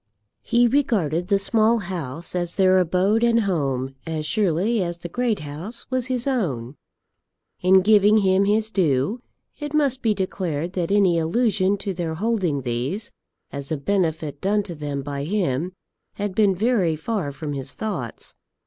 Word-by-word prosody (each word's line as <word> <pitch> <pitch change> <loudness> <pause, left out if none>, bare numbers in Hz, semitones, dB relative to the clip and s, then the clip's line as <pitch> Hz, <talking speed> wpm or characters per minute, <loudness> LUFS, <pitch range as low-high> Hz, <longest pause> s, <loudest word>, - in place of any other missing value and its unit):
He 240 +1 +3
regarded 195 - +1
the 200 0 +3
Small 220 +3 +2
House 170 - -5
as 175 -1 -2
their 185 -1 +4
abode 185 +6 +2
and 230 -1 +4
home 135 - -1
as 155 -1 -3
surely 205 +4 +1
as 170 -1 -2
the 175 0 -8
Great 240 0 -1
House 160 +11 -6
was 255 -1 0
his 250 -2 -1
own. 150 - -2 0.8
In 185 +1 +5
giving 210 +1 +5
him 195 -1 +3
his 215 +2 +1
due, 180 - +1 0.4
it 295 0 -4
must 275 -4 +2
be 220 -3 +2
declared 180 -4 -3
that 175 -3 -1
any 195 -4 +3
allusion 200 +2 +1
to 195 0 -3
their 170 -2 -3
holding 185 - 0
these 125 - -2 0.4
as 140 +1 -5
a 155 - 0
benefit 160 -3 -1
done 205 +2 +1
to 180 - -7
them 145 -3 -4
by 140 0 -4
him 170 -2 -1 0.4
had 205 -1 -3
been 200 -2 +3
very 200 -5 +1
far 165 -2 -3
from 145 +1 -5
his 135 -2 -3
thoughts. 180 - -5
185 Hz, 160 wpm, -23 LUFS, 155-215 Hz, 0.8 s, In